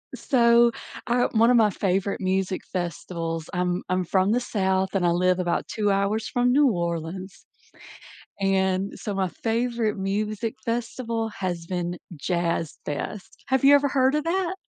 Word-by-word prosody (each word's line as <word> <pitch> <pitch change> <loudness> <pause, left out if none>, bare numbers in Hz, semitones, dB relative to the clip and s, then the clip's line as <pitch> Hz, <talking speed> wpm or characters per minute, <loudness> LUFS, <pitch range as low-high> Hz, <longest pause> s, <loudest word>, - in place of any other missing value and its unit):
So, 235 -2 +4 0.4
uh, 245 +1 +2
one 230 +1 +5
of 245 - +5
my 215 -2 +5
favorite 195 +1 -1
music 190 0 0
festivals 170 -2 -4
I'm 180 0 -1
I'm 185 -1 0
from 190 +3 +2
the 245 - +3
South, 190 -4 0
and 180 -2 +2
I 170 - +4
live 180 +1 +2
about 175 -1 -1
2 210 -2 0
hours 200 +3 0
from 245 0 +2
New 290 0 +5
Orleans, 170 +2 -4 1.0
and 190 0 +1
so 205 - -4
my 190 -1 0
favorite 230 +1 -1
music 210 +3 -2
festival 230 -1 -2
has 175 -4 -4
been 175 -1 -3 0.2
Jazz 170 +1 -2
Fest. 180 +7 -6
Have 265 0 +1
you 280 +1 +8
ever 285 0 +4
heard 265 0 +2
of 300 0 0
that? 360 +2 0
195 Hz, 155 wpm, -25 LUFS, 180-235 Hz, 1.0 s, you